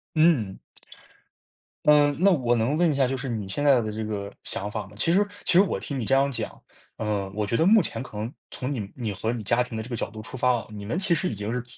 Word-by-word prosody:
嗯。 150 - +3 1.3
呃， 150 -1 +6
那 195 +2 +5
我 125 -8 +2
能 120 +6 +1
问 170 0 +3
一 - - +1
下 135 -2 +3
就 135 - -1
是 130 0 -4
你 105 -4 -3
现 145 +10 -1
在 140 -4 +6
的 110 -2 -2
这 110 +1 -4
个 100 -2 -4
想 105 +1 -3
法 110 -2 -4
吗？ - - -16
其 165 +9 +3
实 205 +2 +4 0.2
其 - - +3
实 180 - +8
我 200 - 0
听 140 -2 -4
你 - - -2
这 135 +5 +2
样 140 +1 +3
讲， 125 - -5 0.4
呃， 105 -3 -2
我 105 -1 0
觉 115 - -1
得 160 - +3
目 215 +4 +6
前 115 - -1
可 110 -5 -9
能 110 +3 -3 0.2
从 135 +2 -4
你 120 - -3
们 100 -1 -6
你 115 -6 -3
和 110 +4 -2
你 120 -2 -4
家 120 +4 +2
庭 120 -2 -4
的 110 - -3
这 120 - -10
个 120 - -3
角 - - -3
度 110 +1 -10
出 110 - -8
发 125 0 +3
啊， - - -13
你 105 -1 -7
们 115 +12 -2
其 185 -2 +2
实 155 - 0
已 110 - -4
经 105 +3 -3
是 125 -1 -2
120 Hz, 305 characters per minute, -25 LUFS, 105-145 Hz, 1.3 s, 实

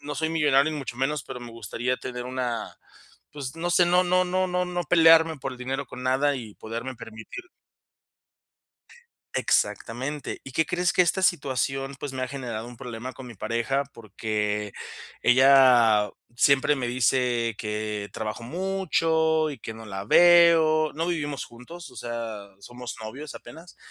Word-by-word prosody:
no 145 +1 -6
soy 160 0 -1
millonario 150 -2 +3
ni 150 - -4
mucho 125 -3 -6
menos, 135 +2 -1
pero 125 -2 -8
me 120 -1 -9
gustaría 115 +3 -3
tener 125 -1 -6
una, 125 -2 -3 0.6
pues, 140 -3 -6
no 175 +1 -2
sé, 175 0 +4
no 180 +1 +4
no 185 +1 +3
no 185 +1 0
no 180 0 0
no 175 0 -3
pelearme 165 -1 +6
por 135 -1 -5
el 125 - -11
dinero 130 +2 -3
con 125 - -9
nada 135 +3 +2
y 110 -5 -8
poderme 115 +3 -6
permitir 115 - -10 1.9
exactamente. 130 +5 -1
¿Y 135 - -9
qué 160 - +2
crees? 175 +2 0
Que 180 - +6
esta 185 +2 +1
situación, 135 -4 0
pues, 145 - -5
me 130 -1 -4
ha 130 - -2
generado 120 -4 -5
un 120 0 -11
problema 125 0 -7
con 130 0 -11
mi 120 - -10
pareja 120 +7 -1
porque, 105 -1 -3 0.5
ella 125 -5 +5 0.3
siempre 140 +3 +4
me 130 -3 -3
dice 120 -1 +1
que, 105 -1 -3
trabajo 110 +2 -5
mucho 160 -1 +1
y 140 - -8
que 110 - -7
no 110 0 -10
la 95 -2 -6
veo 165 +1 +6
no 165 +3 -2
vivimos 145 -5 -2
juntos, 150 +7 -12
o 125 - -17
sea, 115 -3 -5
somos 120 +3 -8
novios 140 +7 -8
apenas 160 +8 -12
130 Hz, 165 wpm, -25 LUFS, 120-160 Hz, 1.9 s, pelearme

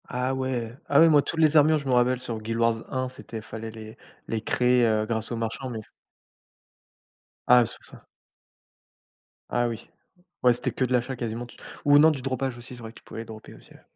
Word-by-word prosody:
Ah 125 +1 -1
ouais! 130 -3 -3
Ah 140 - +5
ouais, 165 - +7
moi, 150 -2 +6
toutes 160 - -4
les 155 -1 +5
armures, 155 +1 +5
je 140 -2 -6
me 130 - +1
rappelle 125 +1 +3
sur 115 -3 -6
Guild 115 +1 -3
Wars 115 -1 +1
1, 130 0 -1
c'était 115 -3 -9
il 110 - -7
fallait 110 0 -7
les 110 0 -11 0.3
les 110 -1 -2
créer, 125 +2 +3
heu, 110 -1 +2
grâce 110 0 -3
aux - - -1
marchands, 115 +3 -4
mais 115 -3 -5
s 110 - -11 1.6
Ah, 125 -1 +7
c'est - - -4
pour - - -19
ça. - - -12 1.5
Ah 120 0 +1
oui, 115 -1 -7 0.5
ouais, 125 -1 +6
c'était 120 - -3
que 130 - 0
de 130 - -2
l'achat 125 +2 0
quasiment 120 0 -4
tu 120 - -16 0.3
ou 145 0 +7
non, 160 +2 +7
du 140 -4 -4
dropage 130 -1 -2
aussi, 120 +1 -11
c'est 120 - -13
vrai 110 -1 -8
que - - -14
tu - - -30
pouvais 115 - -8
droper 110 -1 -11
aussi, - - -18
ouais. - - -18
120 Hz, 230 wpm, -26 LUFS, 115-130 Hz, 1.6 s, ouais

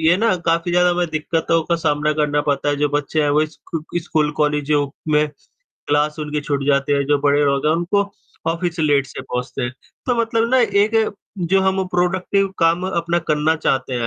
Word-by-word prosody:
ये 165 +2 +4
ना 220 0 +2
काफ़ी 165 +1 +1
ज़्यादा 180 0 +4
हमें 175 0 0
दिक्कतों 160 +1 0
का 170 - +1
सामना 150 -2 0
करना 150 -1 +1
पड़ता 145 0 0
है। 145 - +1
जो 145 +1 +1
बच्चे 145 +2 0
हैं 145 - +1
वो 150 +2 +3
स्कू 160 +2 -6
स्कूल, 155 -3 0
कॉलेज 150 -1 0 0.4
में 150 0 +3 0.6
क्लास 150 +1 +1
उनकी 150 0 -3
छूट 145 -1 -2
जाते 140 0 +2
हैं। 140 0 +1
जो 145 0 +2
बड़े 145 0 +3
लोग 140 +1 +1
हैं 155 - +4
उनको 175 +4 +1 0.5
ऑफिस 170 0 -3
लेट 145 -3 +2
से - - -8
पहुँचते 125 +1 -4
हैं। 120 +1 -2 0.3
तो 250 - +2
मतलब 230 0 +1
ना 260 - +4 0.2
एक 220 +2 +1 0.4
जो 190 +2 +2
हम 190 0 +1
प्रोडक्टिव 185 +2 +1
काम 170 +2 +2
अपना 170 -1 0
करना 150 +2 +2
चाहते 130 -4 -1
हैं 120 -1 -1
155 Hz, 195 wpm, -20 LUFS, 145-175 Hz, 0.6 s, ये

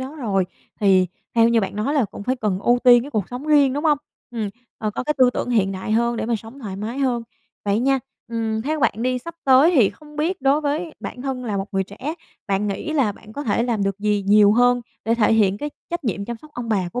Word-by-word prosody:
đó 270 +4 -6
rồi 200 -8 0 0.4
thì 190 -2 +4 0.3
theo 230 0 +5
như 230 -1 +3
bạn 195 +1 -4
nói 270 +8 -1
là 270 -6 +3
cũng 200 - -8
phải 255 +4 -1
cần 210 -5 -1
ưu 245 +3 +3
tiên 240 -1 +7
cái 285 - -8
cuộc 210 -7 -2
sống 250 +4 -6
riêng, 285 -3 +5
đúng 290 +3 -3
hông? 300 -2 +4 0.3
Ừm, 220 -4 -3 0.3
có 215 +2 -2
cái 300 - +1
tư 255 -1 +6
tưởng 245 - -3
hiện 195 -5 +2
đại 190 +3 -4
hơn 235 +1 +2
để - - -2
mà 235 -1 +1
sống 225 +6 -12
thoải 200 -7 -6
mái 225 +6 -4
hơn. 250 -4 0 0.4
Vậy 205 +1 +1
nha, 270 +1 +2 0.3
ừm, 225 -1 -2
theo 305 +2 -2
bạn - - +3
đi 255 0 +1
sắp 335 +7 -9
tới 270 +5 +6
thì 230 -8 +5
không 300 +7 -16
biết 330 +2 -1
đối 275 +3 +3
với 305 +3 -2
bản 250 - -7
thân 260 -2 -3
là 210 -3 -2
một 195 +1 -2
người 195 0 0
trẻ, 255 - -6 0.3
bạn 200 +1 0
nghĩ 260 +11 -3
là 260 -9 +2
bạn 215 +1 -15
có 290 - -5
thể 230 -1 +1
làm 230 -4 0
được 195 0 -1
gì 205 -1 0
nhiều 205 0 +6
hơn 245 +1 +4 0.2
để 230 +1 +2
thể 225 -1 +3
hiện 205 -2 +3
cái 295 0 -4 0.2
trách 345 -4 -3
nhiệm 200 -3 -2
chăm 235 +1 -5
sóc 305 +6 -16
ông 240 -2 -5
bà 190 -5 0
của 245 - -2
235 Hz, 260 wpm, -22 LUFS, 210-270 Hz, 0.4 s, tiên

